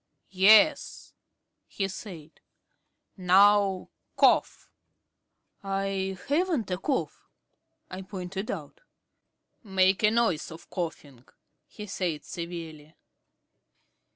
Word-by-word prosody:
"Yes," 220 +11 +4 0.5
he 195 - -3
said. 175 -5 -10 0.8
"Now 195 +1 +3 0.3
cough." - - +2 0.9
"I 195 -1 -3
haven't 295 - 0
a 180 - -2
cough," 270 +6 -3 0.6
I 185 +1 -8
pointed 190 +1 -6
out. - - -7 0.8
"Make 190 -2 +2
the 210 - +4
noise 225 -8 0
of 165 0 -13
coughing," 150 -8 -6 0.4
he 210 - -10
said 175 -6 -4
severely. 165 -3 -8
190 Hz, 85 wpm, -27 LUFS, 175-205 Hz, 0.9 s, Yes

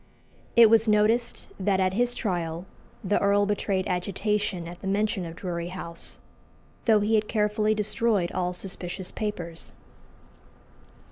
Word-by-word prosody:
It 235 -1 +9
was 225 +1 +4
noticed 220 +3 +2
that 190 0 +1
at 185 0 +2
his 245 +3 +1
trial 175 -5 -2 0.4
the 205 +1 +2
earl 200 0 +3
betrayed 200 -2 -1
agitation 195 0 -1
at 175 +1 -9
the 195 - -5
mention 200 -1 0
of 165 - -8
Drury 170 -2 -4
House, 170 -2 -6 0.7
though 220 -3 +5
he 210 +2 +1
had 215 -1 +3
carefully 210 0 +1
destroyed 210 -3 +1
all 180 -1 -1
suspicious 180 0 -5
papers. 175 -6 -5
200 Hz, 135 wpm, -26 LUFS, 180-215 Hz, 0.7 s, It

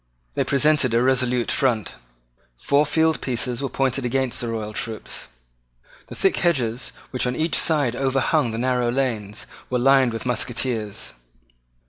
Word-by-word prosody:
They - - +1
presented 140 -3 +2
a 120 - +3
resolute 125 -2 +2
front. 125 - +1 0.6
Four 140 - +2
field 160 +1 +2
pieces 125 0 -1
were 135 - -2
pointed 135 0 0
against 130 0 -1
the 120 - -3
royal 110 -2 -4
troops. 110 0 -4 0.8
The - - -9
thick 195 - +1
hedges, 125 -9 0 0.2
which 125 -1 +1
on 125 - -1
each 160 +2 -1
side 145 -7 +2
overhung 135 +1 +1
the 110 - -4
narrow 125 0 +1
lanes, 115 -5 -2 0.2
were 125 - 0
lined 135 0 +4
with 115 +1 -5
musketeers. 120 - -2
125 Hz, 145 wpm, -23 LUFS, 120-135 Hz, 0.8 s, lined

